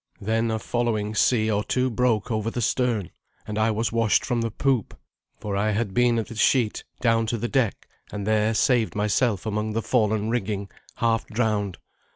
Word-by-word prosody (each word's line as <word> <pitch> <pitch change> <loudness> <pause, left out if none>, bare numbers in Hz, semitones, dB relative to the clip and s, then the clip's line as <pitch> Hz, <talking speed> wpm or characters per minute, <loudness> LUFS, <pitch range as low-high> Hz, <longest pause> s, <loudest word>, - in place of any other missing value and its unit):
Then 115 +2 0
a 110 - 0
following 110 -2 -1
sea 110 0 +2
or 105 0 0
two 130 +2 0
broke 115 -1 +1
over 110 0 -1
the 120 - -4
stern, 120 -5 0 0.3
and 105 0 -4
I 110 +1 +3
was 110 0 -1
washed 115 -2 +2
from 120 -3 0
the 115 - -1
poop, 130 0 -1 0.4
for 100 -2 -4
I 105 +2 +1
had 105 -2 -1
been 120 +1 +3
at 115 - -1
the 115 - -8
sheet, 110 0 +2 0.2
down 115 -2 +2
to 115 - -1
the 120 - -2
deck, 125 -4 0 0.2
and 100 -1 -4
there 110 +1 +2
saved 115 +2 +2
myself 105 0 +1
among 105 0 -2
the 115 0 -1
fallen 110 -2 +1
rigging, 100 -4 -2 0.2
half 115 -1 0
drowned. 105 -4 -1
110 Hz, 190 wpm, -24 LUFS, 105-120 Hz, 0.4 s, I